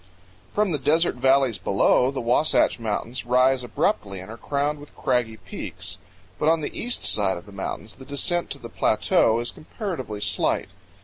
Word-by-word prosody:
From 210 -2 +1
the 150 - 0
desert 160 +6 +3
valleys 130 -3 +3
below, 100 +5 +3
the 135 -1 -3
Wasatch 125 +2 +3
Mountains 115 +3 -3
rise 125 +1 +3
abruptly 100 -4 -1
and 95 +4 -9
are - - -7
crowned 145 +3 -1
with 145 - -14
craggy 120 -4 0
peaks. - - -8 0.4
But 155 - +3
on 165 0 +3
the - - -4
east 245 +1 -1
side 100 -3 +2
of 85 - -10
the 100 - -13
mountains 100 +2 -5
the 130 - -13
descent 160 +5 0
to - - -5
the - - -9
plateau 115 +1 +2
is 120 - -3
comparatively 155 - -5
slight. 100 -1 +1
125 Hz, 175 wpm, -24 LUFS, 110-145 Hz, 0.4 s, desert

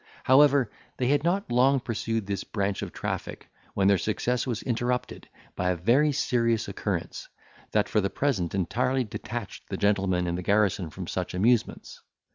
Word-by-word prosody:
However, 135 -3 +5 0.3
they 125 -1 0
had 145 +1 +2
not 180 -1 0
long 130 +3 +4
pursued 115 -2 -2
this 100 0 -3
branch 100 -2 -2
of - - -5
traffic, - - -5 0.2
when 95 -1 +3
their 100 -2 +4
success 125 +4 -1
was 115 -3 -3
interrupted 125 0 -2 0.3
by 90 0 0
a 90 - +1
very 120 - +3
serious 115 -4 +1
occurrence, - - -4 0.4
that - - +1
for 105 - +1
the 100 - 0
present 100 - -1
entirely 125 +8 0
detached 115 0 -7
the - - -3
gentlemen 95 -3 +1
in 85 - -1
the 90 - -3
garrison 100 -2 +1
from 90 +4 -7
such 90 +2 -4
amusements. 115 +5 0
110 Hz, 165 wpm, -27 LUFS, 95-125 Hz, 0.4 s, However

